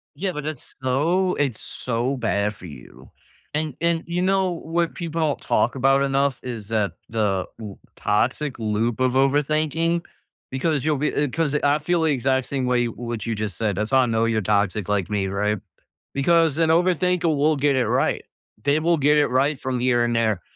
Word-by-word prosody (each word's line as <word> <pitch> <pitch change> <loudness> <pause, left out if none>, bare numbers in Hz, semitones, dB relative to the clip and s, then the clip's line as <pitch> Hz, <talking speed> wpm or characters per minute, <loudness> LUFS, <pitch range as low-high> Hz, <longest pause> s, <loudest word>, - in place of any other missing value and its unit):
Yeah, 185 +5 -2
but 150 -2 -6
it's 155 -4 -6
so 170 +9 +1
it's 135 -6 -1
so 125 +3 -2
bad 105 -3 0
for 90 - -13
you. 70 -7 -13 0.4
And 150 -3 -2
and, 170 -1 +1
you 175 +1 -1
know, 190 0 +2
what 170 0 -2
people 165 -3 -1
talk - - 0
about 135 +1 +3
enough 135 -1 +1
is 115 -5 -6
that 105 -5 0 0.2
the 105 -4 0
u 105 -3 -8 0.2
toxic 125 +7 0
loop 110 +2 -1
of 130 -1 +2
overthinking 155 +5 +1 0.5
because 140 +1 0
you'll 155 -2 +2
be 150 +3 -1
uh, 145 - +1
'cause 155 -1 0
I 145 0 +2
feel 170 +3 0
the 160 - +2
exact 130 -1 +1
same 135 -2 -2
way 125 -1 +2
what 115 -2 -5
you 115 -2 -2
just 105 -2 -4
said. 105 -3 0
That's 105 +4 -2
how 130 - +5
I 130 - +4
know 115 -1 +1
you're 115 -1 +1
toxic 100 0 0
like 100 -3 0
me, 100 -2 -1
right? 105 +2 -1 0.5
Because 160 +1 +3
an 165 -1 +2
overthinker 180 +1 +2
will 150 +2 +2
get 140 0 +2
it 130 -2 +1
right. - - +1 0.4
They 145 +2 +2
will 170 +1 +2
get 150 +1 +3
it 145 - +4
right 135 +3 +1
from 130 -3 -2
here 120 -1 +2
and 120 0 0
there. 110 -5 +1
135 Hz, 195 wpm, -23 LUFS, 115-155 Hz, 0.5 s, how